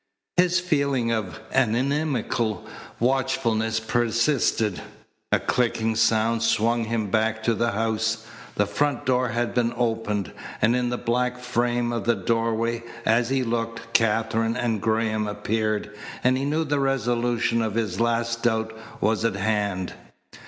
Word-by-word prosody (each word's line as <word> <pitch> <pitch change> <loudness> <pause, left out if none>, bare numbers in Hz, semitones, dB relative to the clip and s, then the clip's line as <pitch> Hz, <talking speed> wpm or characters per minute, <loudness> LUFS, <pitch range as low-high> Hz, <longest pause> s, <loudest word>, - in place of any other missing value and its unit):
His 180 0 +4
feeling 140 -8 +1
of 110 -3 -2
an 125 -4 +3
inimical 125 - -1 0.3
watchfulness 120 -3 +1
persisted. 115 -2 +1 0.5
A - - +4
clicking 115 -2 0
sound 110 +1 +2
swung 115 +1 +2
him 110 -3 -2
back 110 0 +1
to 115 - +2
the 115 0 0
house. 110 +1 -1 0.3
The 105 - +2
front 135 +6 -1
door 125 -1 +2
had 120 +1 -1
been 120 -1 +1
opened, 110 -5 -1 0.3
and 115 +2 +3
in 125 -1 0
the 125 - -2
black 125 +1 0
frame 120 -1 0
of 115 - -3
the 120 0 +3
doorway, 115 +3 0 0.2
as 115 +2 +3
he 135 -1 +1
looked, 115 -1 -3
Katherine 115 +1 +2
and 115 -4 0
Graham 110 -1 0
appeared, 105 0 -2 0.3
and 130 +1 +4
he 135 +1 -1
knew 155 +3 +1
the 145 -2 0
resolution 120 -3 +1
of 110 -2 -2
his 105 -5 -1
last 115 0 0
doubt 110 -1 0 0.3
was 110 0 +1
at 115 -3 +1
hand. 100 -2 -1
115 Hz, 145 wpm, -25 LUFS, 110-120 Hz, 0.5 s, His